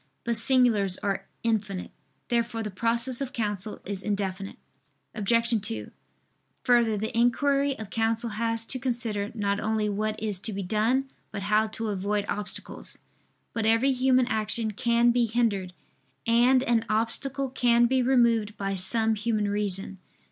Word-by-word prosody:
But 235 0 -1
singulars 225 -5 +3
are 200 -1 -2 0.2
infinite. 210 -5 -1 0.4
Therefore 230 -1 0
the 210 - -4
process 235 +5 -1
of 265 -1 -4
counsel 210 -2 -3
is 195 -1 -3
indefinite. 195 -2 -3 0.6
Obj. 230 +2 +2
2: 110 - -4 0.7
Further, 235 -3 +3
the 220 +2 -3
inquiry 275 +4 +2
of 215 -2 -8
counsel 225 +1 0
has 230 +1 0
to 255 - -2
consider 230 -5 -2
not 200 -2 0
only 215 0 0
what 215 +1 -2
is 210 -3 -1
to 215 +2 -2
be 195 0 -3
done, 230 +8 0 0.2
but 200 -2 -6
how 210 +2 +2
to 220 +1 -4
avoid 205 +1 -1
obstacles. 210 0 -4 0.6
But 225 -1 -1
every 230 +5 +4
human 255 -1 +3
action 220 -1 -1
can 235 +1 +3
be 240 -1 +2
hindered, 215 -5 0 0.5
and 245 +3 +4
an 235 -3 +2
obstacle 255 +5 -1
can 240 -2 +3
be 260 +2 +2
removed 235 -4 +2
by 195 -1 -2
some 220 +4 +2
human 215 -1 -1
reason. 195 -2 -2
225 Hz, 150 wpm, -27 LUFS, 205-240 Hz, 0.7 s, every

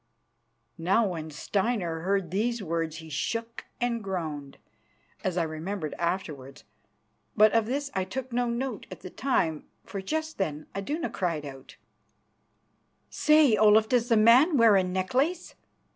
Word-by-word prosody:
Now, 195 +7 +2
when 160 -3 -5
Steinar 185 +1 -1
heard 190 0 -1
these 225 +3 -1
words 165 -2 -2
he 160 0 -9
shook 230 +11 -3
and 235 -2 -1
groaned, 155 -7 -5 0.7
as 185 -1 -1
I 170 - +2
remembered 160 +1 -4
afterwards. 150 -6 -4 0.7
But 215 0 +7
of 225 -1 +2
this 280 +3 -2
I 190 - 0
took 255 +6 -6
no 245 0 +1
note 235 -1 -3
at - - -10
the 185 - -9
time, 170 - -1 0.2
for 195 - -6
just 315 +8 -3
then 155 -5 -2
Iduna 295 +12 -3
cried 165 -5 -2
out: 135 -2 -11 1.4
"Say, 300 -6 +4
Olaf, 215 +1 +5
does 245 -1 +1
the 230 - +4
man 250 +9 +6
wear 230 -3 +6
a 190 - +4
necklace? 250 - -1
200 Hz, 145 wpm, -27 LUFS, 165-240 Hz, 1.4 s, But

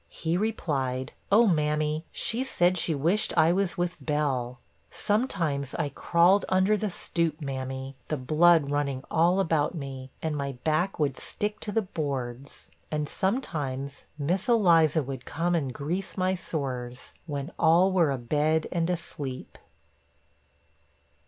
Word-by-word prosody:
he 165 +1 -2
replied, 140 - -1 0.2
'Oh, 225 +4 +7
mammy, 155 -3 +1
she 235 +3 -1
said 180 -8 +2
she 165 -2 0
wished 170 +8 +1
I 160 +1 +6
was 195 -1 0
with 175 0 -2
Bell. 135 -5 -1 0.3
Sometimes 170 - -1
I 150 -3 -1
crawled 175 +7 +3
under 190 +3 +3
the 210 0 -1
stoop, 170 -3 -1
mammy, 135 -1 -5
the 155 - -1
blood 155 +2 +4
running 140 -2 -1
all 175 +4 +3
about 160 -4 +1
me, 135 -3 -6
and 160 -2 -2
my 140 -1 -2
back 160 +5 +1
would 140 -4 0
stick 210 0 -4
to 210 - -3
the 225 +1 +1
boards; 140 -6 -5 0.2
and 150 -1 -2
sometimes 145 - -2
Miss 175 - -1
Eliza 165 -9 +4
would 135 0 -6
come 175 +2 -1
and 145 -6 0
grease 160 +12 -4
my 185 0 +2
sores, 130 -8 -4
when 145 +1 -4
all 170 +4 +5
were 175 -5 +3
abed 150 +5 +1
and 170 -1 0
asleep.' 145 -6 -5
155 Hz, 140 wpm, -27 LUFS, 140-180 Hz, 0.3 s, Oh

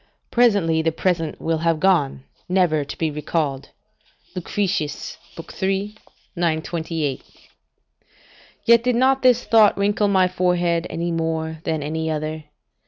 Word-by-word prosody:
["Presently 200 -10 +3
the 165 0 +1
present 165 -2 -1
will 165 -1 -1
have 165 -1 +1
gone, 150 -8 +2 0.3
never 180 -5 +2
to 140 - -8
be 160 -2 -1
recalled." 150 -2 -2 0.7
Lucretius, 180 -4 -2 0.5
iii. 195 +2 -1 0.4
928.] 160 -3 -2 1.4
Yet 235 0 +6
did 250 -1 +1
not 265 +2 +3
this 250 -1 +4
thought 220 -2 +4
wrinkle 205 +1 +1
my 190 -2 +3
forehead 175 -2 0
any 170 +1 -3
more 160 -1 -2
than 155 -2 -1
any 160 +2 -3
other. 155 0 -4
170 Hz, 120 wpm, -22 LUFS, 160-195 Hz, 1.4 s, Yet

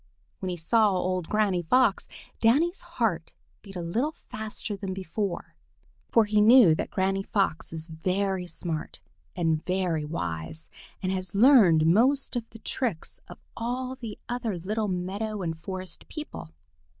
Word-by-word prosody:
When 190 - -3
he 180 - -3
saw 215 +6 +3
old 185 -2 -1
Granny 205 -4 +1
Fox, 210 +4 +3 0.3
Danny's 310 - +3
heart 230 - -2 0.3
beat 195 -2 -12
a 175 - -4
little 240 - -1
faster 215 -3 -6
than 195 -1 -5
before, 190 0 -4 0.6
for 230 -2 +5
he 210 0 +3
knew 225 -5 +8
that - - -2
Granny 195 +1 0
Fox 195 -4 0
is 160 -1 -3
very 185 +3 -1
smart 165 -3 -5 0.4
and 160 -3 +1
very 180 -4 0
wise 90 - -4 0.3
and 185 - 0
has 185 -1 -3
learned 200 - +6
most 250 - +3
of 235 -2 -3
the 225 - -12
tricks 225 -5 -3
of - - -11 0.2
all 250 +2 -3
the 230 -5 -7
other 235 -5 -2
little 210 +5 -2
meadow 195 +3 -3
and 165 -1 -3
forest 185 +1 -6
people. 305 - -7
195 Hz, 150 wpm, -27 LUFS, 175-225 Hz, 0.6 s, knew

